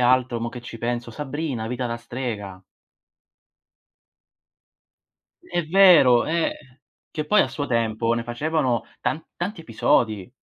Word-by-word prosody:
altro 125 -1 +2
mo 115 - -2
che 120 0 -9
ci 120 -1 -9
penso? 120 0 -3
"Sabrina, 140 -3 -4
vita 125 +1 -3
da 115 0 -4
strega". 105 -7 -6 2.8
È 175 -1 -2
vero, 165 -10 +6
eh, 150 -5 -3 0.3
che 155 -2 -3
poi 210 +6 +5
a - - -2
suo 145 -1 -4
tempo 115 -1 0
ne 120 - -2
facevano 130 0 0 0.2
tan 160 - -2
tanti 180 +1 -4
episodi. 110 - +1
125 Hz, 125 wpm, -23 LUFS, 115-155 Hz, 2.8 s, vero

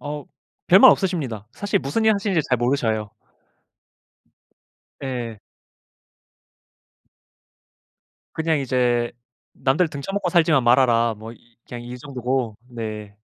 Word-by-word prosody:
어 145 0 -6 0.4
별말 190 +3 +9
없으십니다. 140 - -1
사실 205 0 -1
무슨 145 +12 -1
일 220 0 +5
하시는지 200 -4 0
잘 125 - +3
모르셔요. 115 -4 0 1.9
네. 120 -5 -5 3.0
그냥 160 -1 0
이제 125 -3 +1 0.5
"남들 155 +6 +2
등쳐먹고 185 +7 -3
살지만 160 -6 +4
말아라." 120 -2 +4
뭐 110 +2 -9
이 115 0 -22
그냥 120 -1 -7
이 120 +1 -7
정도고. 125 -4 -3
네. 110 -4 -7
130 Hz, 215 characters per minute, -22 LUFS, 120-160 Hz, 3.0 s, 별말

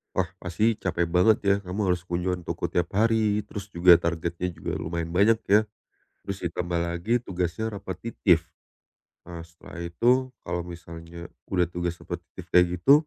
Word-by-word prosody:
Wah, 95 -2 +1
pasti 105 +6 +1
capek 85 -2 0
banget 90 +6 +4
ya 100 - +5
kamu 90 +3 -5
harus 90 -1 0
kunjungan 90 0 -1
toko - - -3
tiap 85 -1 0
hari, 110 0 +2
terus 100 -1 -7
juga 85 0 +7
targetnya 85 +1 -1
juga 80 -1 -6
lumayan 85 0 -3
banyak 110 +4 +5
ya. 105 +2 +5 0.6
Terus 100 -1 -4
ditambah 85 0 -2
lagi 85 +7 -2
tugasnya 90 0 -2
repetitif. 95 -3 0 0.8
Ah, 85 -1 -7
setelah 85 0 -14
itu 125 +9 +2
kalau 85 0 -2
misalnya 85 0 -9 0.2
udah 90 -2 +2
tugas 85 0 -3
repetitif - - -8
kayak 90 0 +7
gitu, 135 - +6
90 Hz, 150 wpm, -26 LUFS, 85-100 Hz, 0.8 s, juga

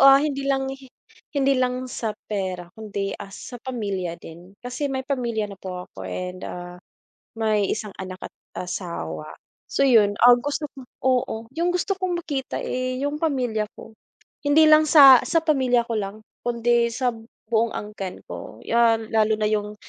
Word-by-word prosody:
ah, 275 0 +9
hindi 275 -2 -2
lang 270 -1 +1 0.7
hindi 275 0 +3
lang 255 0 0
sa 220 -3 -3
pera 185 -4 -4
kundi, 200 -2 -4
ah, - - -7
sa 235 +5 -9
pamilya 200 -9 -3
din. 175 +5 -13
Kasi 265 +4 -2
may 265 -1 -3
pamilya 240 -5 -1
na 195 - -13
po 180 -1 -6
ako 95 -1 -8
and, 180 - -5
ah, 175 0 -8 0.6
may 215 -3 +1
isang 215 -2 -3
anak 185 0 -6
at - - -10 0.3
asawa. 80 - -5 0.4
So, 275 - +2
yun, 210 -6 +5
ah, 245 - +10
gusto 290 +2 -2
ko 270 - -10 0.2
oo, 255 -2 +2 0.2
yung 340 +2 0
gusto 360 +2 0
kong 370 -2 -2
makita, 275 -5 -3
eh, 255 0 -2
yung 290 +1 -2
pamilya 245 -9 0
ko. - - -11 0.5
Hindi 295 +2 +5
lang 310 0 +7
sa 275 -5 +10
sa 330 -1 +2
pamilya 260 -6 +3
ko 230 - -4
lang 195 0 -4 0.2
kundi 235 0 +2
sa 245 +2 0 0.4
buong 230 0 +1
angkan 205 -3 -6
ko - - -9
'yan, 225 -1 +2
lalo 220 -1 +3
na 215 - -3
yung 210 -1 -1
235 Hz, 165 wpm, -24 LUFS, 200-270 Hz, 0.7 s, ah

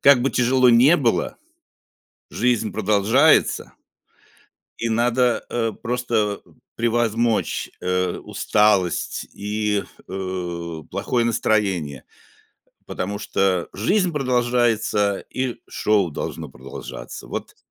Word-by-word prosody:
как 140 -3 +6
бы 135 - +1
тяжело 125 +1 +3
ни 125 +8 +6
было, 125 -9 0 0.9
жизнь 120 -3 0
продолжается. 110 +8 +3 1.1
И 115 - -1
надо, 120 +2 +2
э, 115 -2 -1
просто 115 -4 -1 0.4
превозмочь, 115 -1 0
э, 90 0 0
усталость 105 -5 +1
и, 105 0 -1 0.3
э, 90 -3 -4
плохое 120 -2 0
настроение, 95 - 0 0.8
потому 100 +2 -4
что 95 -3 0
жизнь 180 - +1
продолжается, 120 -6 +1
и 130 -2 -3
шоу 100 -5 +1
должно - - -5
продолжаться. 65 +2 -9
Вот. - - -6
110 Hz, 90 wpm, -22 LUFS, 100-120 Hz, 1.1 s, как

